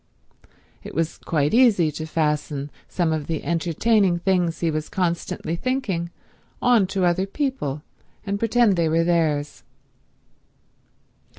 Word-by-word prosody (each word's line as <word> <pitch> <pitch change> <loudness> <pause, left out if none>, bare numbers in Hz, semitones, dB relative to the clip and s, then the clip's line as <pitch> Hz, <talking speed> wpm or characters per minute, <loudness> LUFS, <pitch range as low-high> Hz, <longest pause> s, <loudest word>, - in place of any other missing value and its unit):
It - - -10
was 165 +1 -1
quite 150 -3 0
easy 220 -10 +4
to 155 +2 -6
fasten 150 -2 -1 0.2
some 170 -3 0
of 155 -2 -3
the 160 -2 -3
entertaining 175 +3 +2
things 175 -2 0
he 165 -2 +1
was 155 0 -3
constantly 170 -2 -2
thinking 195 -7 -2 0.5
on 235 -6 +4
to 190 -1 0
other 180 +2 +1
people 195 - -3 0.4
and 200 0 -2
pretend 230 -3 +3
they 165 -2 +2
were 165 +1 +2
theirs. 160 -4 0
170 Hz, 125 wpm, -23 LUFS, 155-195 Hz, 0.5 s, easy